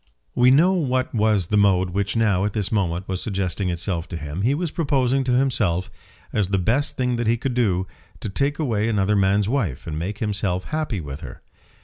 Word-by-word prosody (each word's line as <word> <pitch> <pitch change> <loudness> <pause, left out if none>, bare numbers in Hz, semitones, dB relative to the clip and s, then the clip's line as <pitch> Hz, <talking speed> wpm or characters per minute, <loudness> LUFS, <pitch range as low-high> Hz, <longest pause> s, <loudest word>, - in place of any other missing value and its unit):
We 125 +1 +5
know 165 +8 +5
what 130 -7 0
was 105 -5 +1
the - - +5
mode 95 -2 +3
which 100 +1 -1
now, 105 -5 +2
at 105 -1 -1
this 105 +1 -2
moment, 90 -4 -1
was 95 -1 -3
suggesting 95 -2 -2
itself 85 0 -2
to 85 - -5
him. 75 +3 -5
He 125 +7 +2
was 165 0 -2
proposing 135 -5 +1
to 125 - +1
himself, 110 -9 +1 0.4
as 105 -3 +1
the 100 +1 0
best 115 +10 0
thing 125 -2 0
that 120 -1 -1
he 115 +1 +3
could 125 +2 -2
do, 95 -7 +1 0.3
to - - -5
take 140 +9 -1
away 115 -8 0
another 105 -1 +1
man's 100 +1 +2
wife 105 - -1
and 80 -2 -4
make 100 +5 -4
himself 100 -4 -1
happy 155 - -3
with 70 -1 -7
her! - - -10
105 Hz, 210 wpm, -23 LUFS, 95-125 Hz, 0.4 s, We